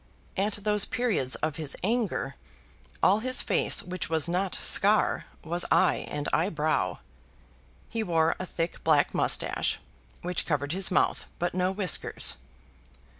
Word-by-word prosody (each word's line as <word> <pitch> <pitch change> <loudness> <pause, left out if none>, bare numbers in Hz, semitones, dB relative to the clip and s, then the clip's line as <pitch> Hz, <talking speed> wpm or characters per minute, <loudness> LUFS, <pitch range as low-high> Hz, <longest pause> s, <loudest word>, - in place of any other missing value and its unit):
At 205 +1 -1
those 210 -1 +3
periods 240 - 0
of 155 -2 -4
his 155 -3 -4
anger, 225 +1 -1 0.7
all 200 +3 +5
his 255 +3 +2
face - - +1
which 185 -2 -4
was 160 -1 +3
not 180 +2 0
scar, 210 +2 +3 0.2
was 175 +2 -1
eye 185 - +3
and 145 0 -3
eyebrow. 155 -3 0 0.9
He 230 - -3
wore 165 -5 +2
a 185 - -4
thick 165 0 -4
black 155 -3 +3
moustache, - - 0 0.4
which 180 -1 -2
covered 145 -2 -1
his 190 +2 0
mouth, 185 - +1
but 175 0 -1
no 185 +1 +1
whiskers. 190 -4 0
180 Hz, 135 wpm, -28 LUFS, 160-205 Hz, 0.9 s, all